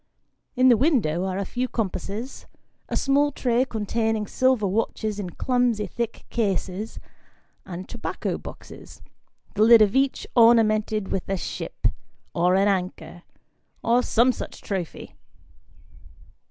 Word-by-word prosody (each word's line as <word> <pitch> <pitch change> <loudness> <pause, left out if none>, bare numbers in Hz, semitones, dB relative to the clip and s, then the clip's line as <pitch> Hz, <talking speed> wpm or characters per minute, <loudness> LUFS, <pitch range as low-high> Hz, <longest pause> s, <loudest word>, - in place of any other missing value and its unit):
In 255 0 +5
the 240 - +6
window, 210 - +1
are 190 -1 -2
a 200 - -2
few 250 +6 -2
com 225 -4 -1
passes, 215 +9 -6 0.4
a - - -2
small 285 +1 +2
tray 245 -2 +1
containing 220 -1 -1
silver 255 0 +1
watches 210 +1 -1
in 190 -3 -4
clumsy 245 +1 0
thick 235 -1 -5
cases; 200 -1 -2 0.7
and 185 0 -7
tobacco 235 - -4
boxes, - - -12 0.5
the 210 - -1
lid 225 0 +8
of 205 +2 0
each 270 0 +1
ornamented 215 -3 +4
with 190 - -3
a 195 - 0
ship, - - -6 0.5
or 180 +2 +2
an 195 +1 +3
anchor, 185 -2 -2 0.6
or 240 +2 +3
some 245 +1 +3
such - - -8
trophy. 185 -5 -5
220 Hz, 130 wpm, -24 LUFS, 195-245 Hz, 0.7 s, lid